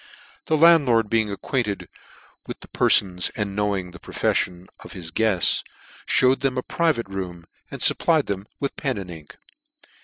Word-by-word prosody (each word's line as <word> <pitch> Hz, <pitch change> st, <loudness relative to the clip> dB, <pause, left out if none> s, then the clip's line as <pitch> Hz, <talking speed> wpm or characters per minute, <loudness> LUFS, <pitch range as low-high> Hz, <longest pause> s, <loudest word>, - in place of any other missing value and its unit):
The 160 Hz, -, +2 dB
landlord 140 Hz, -10 st, +4 dB
being 110 Hz, -2 st, +2 dB
acquainted 105 Hz, 0 st, -3 dB, 0.6 s
with -, -, -8 dB
the -, -, -12 dB
perfons, 90 Hz, -3 st, +3 dB
and 100 Hz, -2 st, -3 dB
knowing 100 Hz, -3 st, -1 dB
the 90 Hz, -, -13 dB
profefllon 90 Hz, +1 st, -1 dB, 0.2 s
of" -, -, -11 dB
his 85 Hz, -2 st, -7 dB
guefts, 100 Hz, -2 st, +2 dB, 0.4 s
fhewed 130 Hz, +1 st, +3 dB
them 135 Hz, -2 st, -1 dB
a 125 Hz, -, -1 dB
private 155 Hz, -, 0 dB
room, 90 Hz, -3 st, -6 dB, 0.2 s
and -, -, -8 dB
fupplied 160 Hz, -4 st, +3 dB
them 100 Hz, 0 st, -5 dB
with 140 Hz, -, -3 dB
pen 130 Hz, -5 st, -2 dB
and 95 Hz, -3 st, -7 dB
ink. 80 Hz, -3 st, -12 dB
105 Hz, 155 wpm, -23 LUFS, 90-130 Hz, 0.6 s, landlord